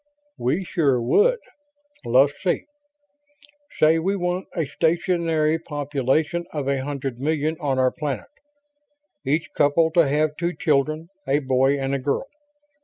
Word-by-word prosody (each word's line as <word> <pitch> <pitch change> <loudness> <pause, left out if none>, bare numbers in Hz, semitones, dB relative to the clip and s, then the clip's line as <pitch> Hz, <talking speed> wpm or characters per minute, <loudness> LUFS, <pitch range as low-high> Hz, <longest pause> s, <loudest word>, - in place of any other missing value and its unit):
"We 150 +10 0
sure 145 -8 +1
would. 445 - +3 0.7
Let's 130 +4 +4
see... 180 -2 0 1.1
say 160 +1 +4
we 190 +5 0
want 180 0 -2
a 165 - 0
stationary 165 -1 +1
population 150 +2 -1
of 145 -3 -3
a 140 -1 0
hundred 135 -3 -4
million 155 +2 0
on 140 -3 -1
our 130 -1 +3
planet. 145 -3 -4 1.0
Each 155 +4 +1
couple 160 +3 +3
to 165 -2 +4
have 150 +2 +1
two 170 +1 -1
children, 155 +2 0 0.2
a 135 +1 +3
boy 135 0 +2
and 135 0 -2
a 140 - 0
girl. 140 - -1
150 Hz, 135 wpm, -23 LUFS, 135-165 Hz, 1.1 s, Let's